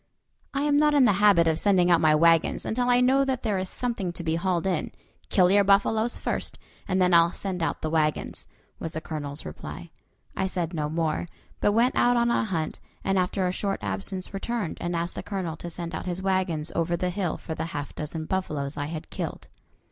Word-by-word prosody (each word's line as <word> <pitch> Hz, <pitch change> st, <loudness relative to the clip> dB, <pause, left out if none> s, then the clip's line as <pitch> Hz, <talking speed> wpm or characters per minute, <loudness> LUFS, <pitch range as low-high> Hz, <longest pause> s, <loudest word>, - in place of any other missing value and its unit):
"I 275 Hz, 0 st, -1 dB
am 290 Hz, -1 st, +3 dB
not 300 Hz, 0 st, +4 dB
in 275 Hz, -3 st, +6 dB
the 210 Hz, -, +5 dB
habit 195 Hz, -6 st, +6 dB
of 160 Hz, -1 st, +2 dB
sending 185 Hz, -3 st, +3 dB
out 170 Hz, -, +5 dB
my 155 Hz, -1 st, +5 dB
wagons 165 Hz, +1 st, +3 dB
until 245 Hz, +2 st, 0 dB
I 245 Hz, 0 st, +5 dB
know 265 Hz, +2 st, +4 dB
that 265 Hz, -2 st, -2 dB
there 210 Hz, -5 st, 0 dB
is 185 Hz, 0 st, -3 dB
something 230 Hz, -8 st, -2 dB
to 175 Hz, -, -7 dB
be 160 Hz, -1 st, 0 dB
hauled 175 Hz, +1 st, 0 dB
in; 185 Hz, -5 st, -1 dB, 0.4 s
kill 185 Hz, -2 st, +4 dB
your 200 Hz, +1 st, +5 dB
buffaloes 215 Hz, +4 st, +2 dB
first, -, -, -3 dB, 0.3 s
and 185 Hz, -1 st, +1 dB
then 180 Hz, -1 st, +3 dB
I'll 170 Hz, 0 st, +6 dB
send 185 Hz, -3 st, -4 dB
out 165 Hz, -, -2 dB
the 155 Hz, -, 0 dB
wagons," 155 Hz, -2 st, -1 dB, 0.3 s
was 165 Hz, -, -4 dB
the 160 Hz, -, -2 dB
Colonel's 145 Hz, -3 st, -5 dB
reply. 75 Hz, -, -8 dB, 0.4 s
I 190 Hz, -, 0 dB
said 180 Hz, -2 st, -2 dB
no 150 Hz, -2 st, -1 dB
more, 160 Hz, +1 st, -1 dB, 0.3 s
but 205 Hz, -, +2 dB
went 235 Hz, +4 st, +3 dB
out 245 Hz, 0 st, +4 dB
on 235 Hz, 0 st, +3 dB
a -, -, +2 dB
hunt, 165 Hz, -7 st, -3 dB, 0.2 s
and 195 Hz, -1 st, +2 dB
after 185 Hz, +1 st, 0 dB
a 180 Hz, -, +1 dB
short 195 Hz, +1 st, -2 dB
absence 100 Hz, -, -3 dB
returned 205 Hz, -2 st, -3 dB
and 175 Hz, 0 st, -2 dB
asked 170 Hz, +1 st, -2 dB
the -, -, -5 dB
Colonel 185 Hz, -5 st, -4 dB
to 175 Hz, -, -6 dB
send 170 Hz, 0 st, -6 dB
out -, -, -5 dB
his 180 Hz, 0 st, -2 dB
wagons 185 Hz, -5 st, 0 dB
over 170 Hz, +1 st, 0 dB
the 180 Hz, +1 st, -1 dB
hill 185 Hz, -3 st, -2 dB
for 160 Hz, -, -6 dB
the 160 Hz, -, -3 dB
half 145 Hz, -3 st, -5 dB
dozen 155 Hz, +1 st, -5 dB
buffaloes 155 Hz, -6 st, -2 dB
I 145 Hz, -, -2 dB
had 160 Hz, 0 st, -7 dB
killed. -, -, -5 dB
180 Hz, 220 wpm, -26 LUFS, 160-200 Hz, 0.4 s, in